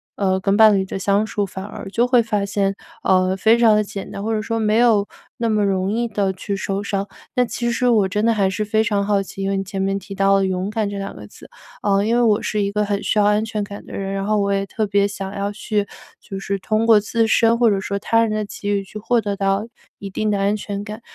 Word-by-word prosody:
呃， 190 -2 +1
跟 195 +1 +1
伴 220 0 +7
侣 190 - 0
的 190 - -5
相 200 +2 +1
处， 210 -2 -2
反 190 0 -7
而 205 -1 -8
就 235 +5 +1
会 250 -1 +5
发 210 -3 -1
现， 200 -1 0 0.3
呃， 185 0 +3
非 220 +4 +4
常 230 -2 +5
地 210 - +2
简 200 -1 -7
单， 200 - -6
或 225 +1 -1
者 215 - 0
说 225 +1 -2
没 215 0 +2
有 225 -4 +4 0.3
那 230 -1 -1
么 215 -1 +2
容 190 0 0
易 235 +2 0
地 200 -3 0
去 200 +2 -4
受 195 +1 -3
伤。 200 0 -2 0.3
那 250 -1 +3
其 235 0 -2
实 250 +1 0
我 215 -5 +3
真 210 +2 -1
的 230 - +4
还 200 -3 +2
是 210 +3 -2
非 215 +1 +1
常 205 -2 0
好 200 -1 +1
奇， 195 - -9
因 195 - -1
为 195 - 0
你 195 - -1
前 195 0 -4
面 195 0 0
提 200 +1 -8
到 195 0 +3
了 195 0 +2
勇 185 +1 -2
敢 215 -1 -1
这 200 - -5
两 195 - -6
个 105 - -10
字， - - -15 0.3
嗯， 200 0 +2
因 225 - +1
为 240 - +3
我 215 -3 +3
是 210 - -1
一 200 0 -1
个 210 +1 0
很 200 0 -1
需 - - 0
要 210 - +4
安 210 +1 +3
全 215 -2 -3
感 200 0 -8
的 - - -11
人， 195 0 -3
然 195 0 -2
后 215 +1 +1
我 200 0 0
也 195 0 0
特 215 +2 -2
别 200 0 +2
想 195 -1 -6
要 200 +1 -2
去， 205 0 -2 0.3
就 195 - -8
是 195 0 -3
通 215 +3 0
过 225 -2 +6
自 225 +2 0
身 230 +1 +3
或 235 -1 +4
者 200 - +1
说 200 +1 -3
他 230 +3 +2
人 230 - +1
的 215 0 -1
机 205 0 -6
遇 200 -1 0
去 215 +2 -9
获 235 +3 +1
得 205 -1 -2
到， 195 +1 0 0.3
一 200 - -7
定 215 +3 -2
的 205 - +1
安 200 +1 +1
全 205 -1 -5
感。 210 +2 -8
205 Hz, 300 characters per minute, -20 LUFS, 195-215 Hz, 0.3 s, 伴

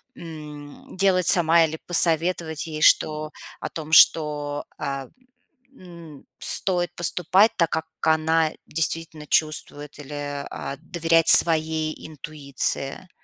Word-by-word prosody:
м, 150 -2 -13
делать 185 -2 +1
сама. 170 -2 +5
Или 160 0 -7
посоветовать 165 -2 +1
ей, 155 -1 -8
что 155 0 +1 0.3
о - - -6
том, 160 -1 -10
что, 150 -2 +2
а, 140 -1 -6 0.7
м, 170 - -15 0.2
стоит 175 -2 -1
поступать 180 +5 +2
так, 170 -3 0
как 160 0 -4 0.2
она 160 0 0 0.2
действительно 160 0 -4
чувствует, 150 -1 -3
или, 145 0 -8
а, 140 - -8
доверять 165 -1 -1
своей 160 -1 +4
интуиции. 145 +1 -4
160 Hz, 110 wpm, -22 LUFS, 150-170 Hz, 0.7 s, сама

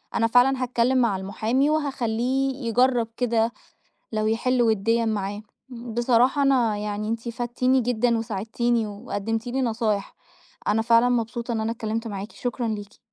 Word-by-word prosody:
أنا 230 - +3
فعلًا 255 +3 +4
هاتكلم 250 +1 +1
مع 235 -5 +2
المحامي 220 +8 0
وهاخلّيه 270 -2 0
يجرب 245 0 +2
كده 230 -2 +1 0.6
لو 215 -1 -1
يحل 245 +3 +1
وِدّيًا 225 +1 +2
معاه، 205 -1 -2 0.3
بصراحة 240 +2 +1
أنا 250 -6 +3
يعني 210 0 -3
أنتِ 230 +1 -3
فدتِيني 245 +2 +1
جدًا 240 0 +1
وساعدتِيني 225 +2 -1
وقدمتِ 215 +3 -4
لي 260 +2 -1
نصايح، 220 -4 -1 0.5
أنا 215 +2 +2
فعلًا 230 +2 +4
مبسوطة 235 0 -1
إن 225 -1 -1
أنا 220 +1 -1
اتكلمت 225 0 -3
معاكِ، 205 0 -6
شكرًا 245 -1 -3
ليكِ. 205 -2 -5
230 Hz, 140 wpm, -24 LUFS, 220-245 Hz, 0.6 s, فعلًا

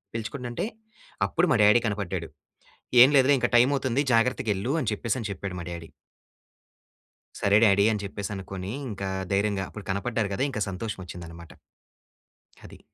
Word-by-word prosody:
పిలుచుకుంటుంటే 120 - -4 0.6
అప్పుడు 175 +2 +1
మా 135 - +4
డ్యాడీ 105 +3 +6
కనపడ్డాడు. 95 -5 -3 0.7
ఏం 130 - +8
లేదులే 135 +1 +5
ఇంక 120 - +2
టైమ్ 125 +3 +5
అవుతుంది, 130 -1 0
జాగ్రత్తగెళ్ళు 115 -1 +1
అని 115 - -1
చెప్పేసి 115 +3 -2
అని 110 - -4
చెప్పాడు, 100 -1 -5
మా - - -6
డ్యాడీ. 85 -1 -7 1.5
సరే 100 +1 +4
డాడీ 100 -1 +5
అని 105 -2 -2
చెప్పేసి 100 +1 -5
అనుకోని, 95 0 -6 0.2
ఇంకా 100 -2 -4 0.2
ధైర్యంగా 100 0 +1
అప్పుడు 105 - -10
కనపడ్డారు 100 +2 -1
కదా! 130 - -1
ఇంకా 105 -5 -4
సంతోషం 100 +2 -5
వచ్చిందన్నమాట. 85 -1 -10 1.1
అది. - - -13
105 Hz, 145 wpm, -26 LUFS, 95-120 Hz, 1.5 s, ఏం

